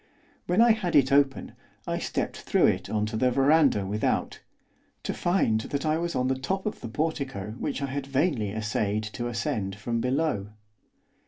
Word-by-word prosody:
When 180 Hz, +6 st, +3 dB
I 235 Hz, 0 st, +7 dB
had 210 Hz, -6 st, 0 dB
it 135 Hz, -2 st, +5 dB
open 140 Hz, -1 st, +2 dB, 0.3 s
I -, -, -2 dB
stepped -, -, -2 dB
through -, -, +2 dB
it -, -, +1 dB
on 105 Hz, -1 st, 0 dB
to 110 Hz, -, -4 dB
the 125 Hz, +3 st, +3 dB
verandah 135 Hz, -5 st, +3 dB
without, 105 Hz, +2 st, -1 dB, 0.6 s
to -, -, -2 dB
find 175 Hz, -, +1 dB
that 140 Hz, +5 st, -3 dB
I 155 Hz, +1 st, +1 dB
was 170 Hz, 0 st, -2 dB
on 125 Hz, 0 st, +1 dB
the 130 Hz, 0 st, 0 dB
top 190 Hz, +8 st, -2 dB
of 215 Hz, -, -3 dB
the 115 Hz, -, -6 dB
portico 135 Hz, -7 st, -3 dB
which 140 Hz, -, -2 dB
I 135 Hz, -, -3 dB
had 140 Hz, 0 st, -4 dB
vainly 135 Hz, -, +1 dB
essayed 105 Hz, 0 st, -1 dB
to 120 Hz, +3 st, -4 dB
ascend 115 Hz, -5 st, -2 dB
from 115 Hz, +3 st, -2 dB
below. 125 Hz, -6 st, -1 dB
130 Hz, 180 wpm, -27 LUFS, 110-155 Hz, 0.6 s, I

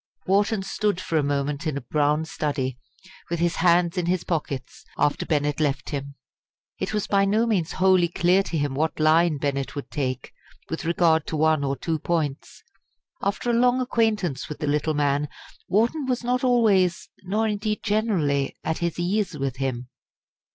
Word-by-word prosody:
Wharton 200 Hz, +1 st, +2 dB
stood 200 Hz, 0 st, -1 dB
for 185 Hz, -3 st, -4 dB
a 155 Hz, -, +4 dB
moment 145 Hz, +2 st, -1 dB
in 150 Hz, -3 st, -1 dB
a -, -, -4 dB
brown 150 Hz, +4 st, +1 dB
study, 135 Hz, -5 st, -3 dB, 0.5 s
with 170 Hz, -, -1 dB
his 170 Hz, 0 st, +1 dB
hands 175 Hz, +1 st, +3 dB
in 170 Hz, -, -2 dB
his 180 Hz, 0 st, 0 dB
pockets, 140 Hz, -6 st, -4 dB
after 145 Hz, 0 st, +1 dB
Bennett 150 Hz, -2 st, 0 dB
left 140 Hz, -3 st, -1 dB
him. 140 Hz, -1 st, -5 dB, 0.6 s
It -, -, -2 dB
was 210 Hz, -1 st, -1 dB
by 200 Hz, -1 st, +2 dB
no 210 Hz, +4 st, +2 dB
means 190 Hz, -8 st, 0 dB
wholly 185 Hz, -2 st, +4 dB
clear 180 Hz, +2 st, +3 dB
to 170 Hz, -4 st, -3 dB
him 145 Hz, -2 st, -1 dB
what 155 Hz, +4 st, -1 dB
line 155 Hz, +1 st, +4 dB
Bennett 140 Hz, 0 st, -2 dB
would 145 Hz, -, -6 dB
take 130 Hz, -3 st, -3 dB, 0.4 s
with 160 Hz, -, -4 dB
regard 165 Hz, -2 st, +2 dB
to 155 Hz, -, -2 dB
one 155 Hz, -1 st, +3 dB
or 140 Hz, 0 st, 0 dB
two 160 Hz, +3 st, -2 dB
points. 150 Hz, -4 st, -3 dB, 0.6 s
After 200 Hz, +4 st, -1 dB
a -, -, 0 dB
long 245 Hz, +2 st, +3 dB
acquaintance 215 Hz, -, 0 dB
with 150 Hz, -, -5 dB
the -, -, -3 dB
little 150 Hz, +1 st, 0 dB
man, 145 Hz, 0 st, +1 dB, 0.4 s
Wharton 240 Hz, +8 st, +1 dB
was 250 Hz, -1 st, -1 dB
not 250 Hz, +1 st, 0 dB
always, 210 Hz, -8 st, +3 dB
nor 210 Hz, +4 st, 0 dB
indeed 210 Hz, 0 st, -2 dB
generally, 185 Hz, -11 st, 0 dB
at 160 Hz, -, -2 dB
his 170 Hz, -1 st, -2 dB
ease 185 Hz, -1 st, -1 dB
with 135 Hz, -2 st, -3 dB
him. 125 Hz, -2 st, -3 dB
165 Hz, 175 wpm, -24 LUFS, 145-195 Hz, 0.6 s, a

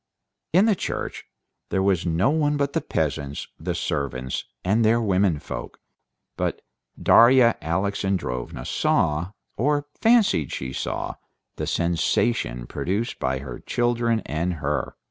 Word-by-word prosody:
In 185 Hz, +6 st, +5 dB
the 225 Hz, -, +4 dB
church 185 Hz, -, -4 dB, 0.4 s
there 95 Hz, -, +1 dB
was 95 Hz, -2 st, +1 dB
no 85 Hz, -, +2 dB
one 150 Hz, -1 st, +1 dB
but 140 Hz, -1 st, 0 dB
the -, -, +1 dB
peasants, 70 Hz, 0 st, -2 dB
the -, -, -3 dB
servants 65 Hz, -2 st, -2 dB, 0.2 s
and 105 Hz, +5 st, +3 dB
their 115 Hz, +2 st, +4 dB
women 95 Hz, -6 st, +2 dB
folk. -, -, -7 dB, 0.6 s
But -, -, -2 dB, 0.4 s
Darya 120 Hz, 0 st, +6 dB
Alexandrovna 95 Hz, -6 st, -2 dB
saw, 85 Hz, +6 st, +1 dB, 0.2 s
or 145 Hz, +3 st, +1 dB, 0.2 s
fancied 220 Hz, -, +4 dB
she 65 Hz, 0 st, -4 dB
saw, -, -, -3 dB, 0.4 s
the -, -, -3 dB
sensation 85 Hz, -, 0 dB
produced 100 Hz, -, -2 dB
by 65 Hz, -1 st, 0 dB
her 65 Hz, -3 st, -7 dB
children 120 Hz, -2 st, 0 dB
and 85 Hz, +4 st, -1 dB
her. 70 Hz, -3 st, -2 dB
95 Hz, 125 wpm, -24 LUFS, 75-120 Hz, 0.6 s, Darya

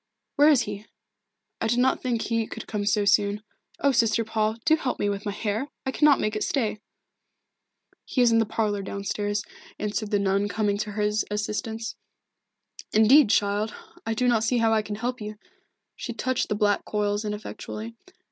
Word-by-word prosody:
"Where 295 Hz, +2 st, +6 dB
is 285 Hz, -5 st, +5 dB
he? 205 Hz, 0 st, -6 dB, 0.7 s
I 225 Hz, -, +1 dB
did 240 Hz, +2 st, +1 dB
not 255 Hz, +2 st, +2 dB
think 240 Hz, -3 st, -1 dB
he 230 Hz, -1 st, -1 dB
could 225 Hz, -, -7 dB
come 205 Hz, -2 st, -3 dB
so 205 Hz, 0 st, +2 dB
soon. 200 Hz, +2 st, +2 dB, 0.4 s
Oh, 280 Hz, -, +4 dB
Sister 230 Hz, -2 st, +2 dB
Paul, 220 Hz, 0 st, 0 dB
do 315 Hz, -, +6 dB
help 275 Hz, -5 st, -2 dB
me 205 Hz, -, 0 dB
with 200 Hz, +1 st, -3 dB
my -, -, 0 dB
hair! 210 Hz, +5 st, -2 dB, 0.2 s
I 265 Hz, -, 0 dB
cannot 295 Hz, 0 st, +4 dB
make 215 Hz, 0 st, -1 dB
it 215 Hz, -, -1 dB
stay." 220 Hz, -6 st, -1 dB, 1.2 s
"He -, -, -3 dB
is 240 Hz, -1 st, +5 dB
in 230 Hz, -, +4 dB
the 225 Hz, -, +1 dB
parlour, 210 Hz, -2 st, -1 dB
down 200 Hz, +1 st, -5 dB
stairs," 205 Hz, 0 st, -1 dB, 0.3 s
answered 210 Hz, 0 st, -2 dB
the 205 Hz, -, +2 dB
nun, 200 Hz, 0 st, +1 dB
coming 205 Hz, 0 st, 0 dB
to 210 Hz, 0 st, -3 dB
her 210 Hz, 0 st, -1 dB, 0.3 s
assistance. 220 Hz, +2 st, -3 dB, 0.9 s
"Indeed, 220 Hz, +4 st, +6 dB
child, 205 Hz, +1 st, +1 dB, 0.3 s
I 225 Hz, 0 st, -2 dB
do 250 Hz, +3 st, +1 dB
not 230 Hz, -2 st, +3 dB
see 240 Hz, +3 st, +1 dB
how 225 Hz, -1 st, +3 dB
I 220 Hz, -, +3 dB
can 210 Hz, 0 st, -5 dB
help 245 Hz, +2 st, -3 dB
you." 210 Hz, 0 st, -6 dB, 0.6 s
She 240 Hz, -, -5 dB
touched 255 Hz, +2 st, -1 dB
the 210 Hz, -, 0 dB
black 205 Hz, -1 st, +2 dB
coils 205 Hz, 0 st, -1 dB
ineffectually. 215 Hz, +1 st, -6 dB
215 Hz, 185 wpm, -26 LUFS, 205-230 Hz, 1.2 s, Where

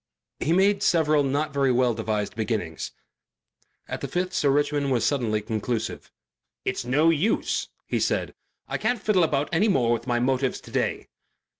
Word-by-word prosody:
He 160 Hz, -, 0 dB
made 195 Hz, +3 st, +3 dB
several 155 Hz, -3 st, +3 dB
not 145 Hz, +2 st, -1 dB
very 140 Hz, -2 st, +2 dB
well 125 Hz, -1 st, +3 dB
devised 110 Hz, -2 st, -2 dB
beginnings. 110 Hz, -8 st, -3 dB, 1.0 s
At -, -, -5 dB
the -, -, -3 dB
fifth 180 Hz, +1 st, -2 dB
Sir 145 Hz, -, +2 dB
Richmond 145 Hz, 0 st, +1 dB
was 120 Hz, -3 st, +2 dB
suddenly 115 Hz, -7 st, +1 dB
conclusive. 110 Hz, +2 st, -3 dB, 0.5 s
"It's -, -, -1 dB
no 145 Hz, +7 st, +3 dB
use," 165 Hz, +8 st, 0 dB, 0.2 s
he -, -, -1 dB
said, -, -, 0 dB, 0.3 s
"I -, -, -3 dB
can't 245 Hz, -1 st, 0 dB
fiddle 195 Hz, -3 st, +2 dB
about 145 Hz, -2 st, 0 dB
any 175 Hz, +6 st, +3 dB
more 125 Hz, -, +2 dB
with 120 Hz, +1 st, -3 dB
my 120 Hz, -2 st, +1 dB
motives 130 Hz, +1 st, 0 dB
to -, -, -14 dB
day." -, -, -1 dB
140 Hz, 165 wpm, -25 LUFS, 120-160 Hz, 1.0 s, made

